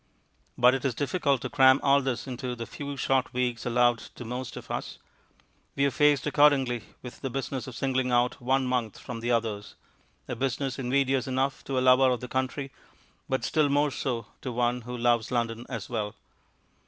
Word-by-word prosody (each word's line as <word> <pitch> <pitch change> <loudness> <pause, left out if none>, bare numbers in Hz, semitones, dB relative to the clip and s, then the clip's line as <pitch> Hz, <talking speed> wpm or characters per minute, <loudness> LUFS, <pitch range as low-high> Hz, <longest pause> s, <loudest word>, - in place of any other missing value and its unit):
But 125 +1 +6
it 135 - -2
is 130 -4 0
difficult 140 -2 0
to 130 - -4
cram 130 0 +6
all 140 0 +5
this 130 -3 -2
into 125 -1 -4
the 115 -1 -5
few 140 +3 -7
short 130 0 +1
weeks 125 -2 -1
allowed 120 -1 +3
to 120 - -11
most 125 0 -5
of - - -9
us. - - -4 0.8
We 140 - +2
are 140 - +2
faced 145 0 +3
accordingly 140 -6 +3 0.2
with 125 - -10
the 135 - -2
business 135 0 -4
of 130 - -8
singling 130 -1 0
out 120 +1 +1
one 130 +2 +1
month 125 -4 -1
from 120 -2 -7
the 120 +1 -3
others 110 -3 -1 0.5
a - - -3
business 135 0 -2
invidious 135 +1 +1
enough 135 +1 -1
to 135 - -2
a - - +2
lover 130 +1 +6
of 125 -2 0
the 125 - -7
country, 130 +2 -2 0.6
but 130 - 0
still 155 -3 +2
more 145 +1 +2
so 120 -5 -3 0.2
to 130 - -4
one 120 +1 0
who 125 +1 -6
loves 120 -1 +2
London 115 -1 -2
as 115 -6 -5
well. 110 -3 -3
130 Hz, 190 wpm, -27 LUFS, 120-135 Hz, 0.8 s, But